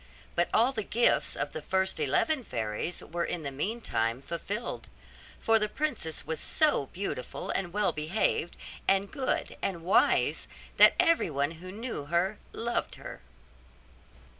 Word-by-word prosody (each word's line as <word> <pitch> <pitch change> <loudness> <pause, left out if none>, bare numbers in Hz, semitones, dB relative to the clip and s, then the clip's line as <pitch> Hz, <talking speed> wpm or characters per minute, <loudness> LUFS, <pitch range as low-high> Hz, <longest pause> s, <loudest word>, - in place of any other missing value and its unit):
But 175 - +1
all 240 +4 +4
the 225 - -2
gifts 235 +3 +2
of - - -2
the - - -4
first 190 -1 0
eleven 260 - +1
fairies 115 - -2
were 170 +1 -3
in 170 -2 -3
the 140 - -3
meantime 135 - -1
fulfilled; 195 - -4 0.5
for 225 0 +4
the 210 0 0
princess 245 - -2
was 160 - -3
so 300 - +2
beautiful, 180 -8 -4
and 175 -3 -2
well 205 +2 +2
behaved, 165 +2 0 0.3
and 195 +1 +2
good, 265 -2 -1
and 170 -4 -2
wise, 185 - +3 0.3
that - - +8
everyone 150 - +2
who 175 +3 -9
knew 220 - -5
her 175 +6 0
loved 235 +1 -2
her. - - -9
190 Hz, 140 wpm, -29 LUFS, 155-225 Hz, 0.5 s, that